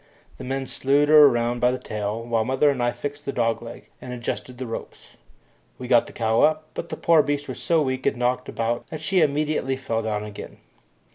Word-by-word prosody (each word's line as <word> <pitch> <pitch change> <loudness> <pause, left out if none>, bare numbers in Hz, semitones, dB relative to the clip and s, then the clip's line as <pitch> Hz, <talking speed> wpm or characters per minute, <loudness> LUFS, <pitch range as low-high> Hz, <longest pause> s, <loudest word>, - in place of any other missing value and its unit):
The - - -7
men 135 +1 -3
slewed 140 +3 +1
her 150 -2 +9
round 120 0 -1
by 125 - +4
the 125 - -1
tail, 105 0 -4
while 115 -1 0
mother 130 +4 +2
and 130 -3 -3
I 120 0 +2
fixed 145 +2 -6
the 140 - -3
dog 115 -3 0
leg 115 - -10
and 125 - -8
adjusted 125 +1 -5
the 130 - -5
ropes. 115 - -8 0.7
We 125 - -7
got 120 -2 +4
the - - -10
cow 115 0 +1
up, 155 0 +3
but 170 - -6
the - - -5
poor 165 -2 +5
beast 145 0 -2
was - - -6
so 165 -2 +2
weak 130 -1 -2
and - - +1
knocked 125 +1 -1
about 115 +1 -2
that 155 - -7
she 180 +4 +1
immediately 150 -2 0
fell 115 -4 -2
down 105 -1 -2
again. 105 -1 -9
130 Hz, 220 wpm, -24 LUFS, 115-145 Hz, 0.7 s, her